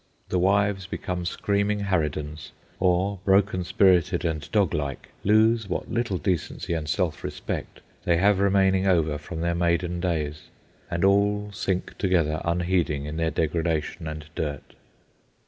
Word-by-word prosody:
The 90 - +1
wives 100 0 +2
become 90 -2 -4
screaming 100 +3 0
harridans 75 -5 -2 0.3
or, 95 +2 +1
broken 95 -1 +3
spirited 90 -1 +3
and 80 -2 -1
doglike, 75 -9 0
lose 110 +1 +3
what - - -3
little 115 -5 0
decency 85 +1 -2
and 80 -2 -3
self 85 -2 -1
respect - - -5 0.2
they 85 -1 +2
have 100 +2 +3
remaining 95 -1 +3
over 80 -5 +2
from 80 +2 -6
their 85 0 +1
maiden 85 0 0
days, 80 -4 -2 0.4
and 85 +2 0
all 105 +1 +2
sink 95 -1 -2
together, 85 -5 +1
unheeding, 85 -4 0
in 75 +1 -5
their 80 0 +1
degradation 80 0 -1
and 75 0 -6
dirt. 75 -4 -4
90 Hz, 135 wpm, -25 LUFS, 80-100 Hz, 0.4 s, broken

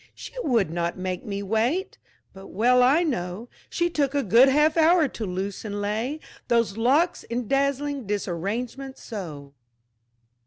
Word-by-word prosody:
"She - - -10
would 230 - +1
not 170 +1 -2
make 185 -1 -4
me 200 -1 -4
wait!" 255 - -1 0.3
but 195 0 -11
well 250 +4 +3
I 275 +7 +4
know 225 - -3 0.2
She 345 - 0
took 290 -4 -1
a 285 - +1
good 235 +7 +6
half 300 +3 +3
hour 325 -1 +5
to 230 -4 -6
loose 190 +2 -4
and 205 -2 -4
lay 220 +9 -2 0.3
Those 230 -4 +1
locks 280 +10 +2
in 235 -1 -3
dazzling 280 -1 0
disarrangement 210 +8 -3
so! 155 - -8
235 Hz, 150 wpm, -25 LUFS, 200-280 Hz, 0.3 s, good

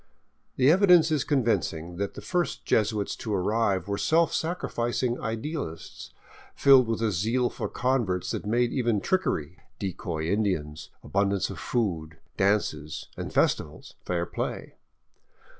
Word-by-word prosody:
The 135 +3 +5
evidence 175 -3 +5
is 150 -3 +2
convincing 90 - 0
that 100 +1 -3
the - - -7
first 175 -1 -2
Jesuits 105 -2 +1
to 105 -2 -3
arrive 100 -1 0
were 100 0 -2
self 165 +6 +3
sacrificing 125 -7 -1
idealists, 115 - -5 0.4
filled 135 -3 +6
with 115 0 -1
a 110 - +2
zeal 115 +7 0
for - - -4
converts 120 -8 0
that - - -3
made 120 +2 +2
even 120 -5 +1
trickery,— 90 - -1 0.2
decoy 85 -4 -4
Indians, 85 -6 -1
abundance 100 +5 0
of - - -8
food, 85 -9 -2 0.2
dances 100 -6 0
and - - -5
festivals - - 0
— - - -40
fair 85 -1 0
play. - - -5
110 Hz, 135 wpm, -27 LUFS, 90-130 Hz, 0.4 s, filled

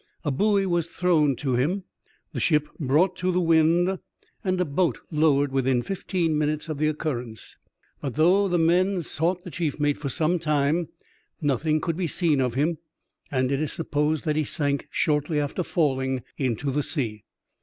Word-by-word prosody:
A 145 - +1
buoy 200 +7 +2
was 175 -3 0
thrown 160 -7 +2
to 130 +1 -2
him, 160 +11 0 0.5
the - - -3
ship 150 -3 +2
brought 160 +6 +2
to 185 0 0
the 180 - +1
wind, 170 +2 +3 0.4
and 185 -1 0
a 180 - +2
boat 155 -1 0
lowered 145 -3 +3
within 130 -2 +1
fifteen 175 -3 -1
minutes 150 +1 -1
of 150 -2 -4
the 155 - +2
occurrence. 125 -8 -4 0.5
But 135 -4 -4
though 180 +6 +4
the 175 -2 +1
men 175 +3 +2
sought 175 +4 -1
the 180 - -8
chief 155 -4 -2
mate 145 -1 +1
for 140 - -3
some, 160 +6 +1
time, 150 +1 +1 0.5
nothing 155 +2 +1
could 165 +1 -2
be 180 -2 -1
seen 155 -3 +1
of 125 -2 -1
him, 155 +3 0 0.5
and 130 -1 0
it 140 +1 0
is 155 - -2
supposed 150 0 -1
that 155 -1 +1
he 155 - +2
sank 145 -1 -1
shortly 150 0 0
after 145 +5 -2
falling 130 -7 0
into 135 +1 -1
the 150 +3 0
sea. 115 - -3
155 Hz, 175 wpm, -25 LUFS, 140-175 Hz, 0.5 s, though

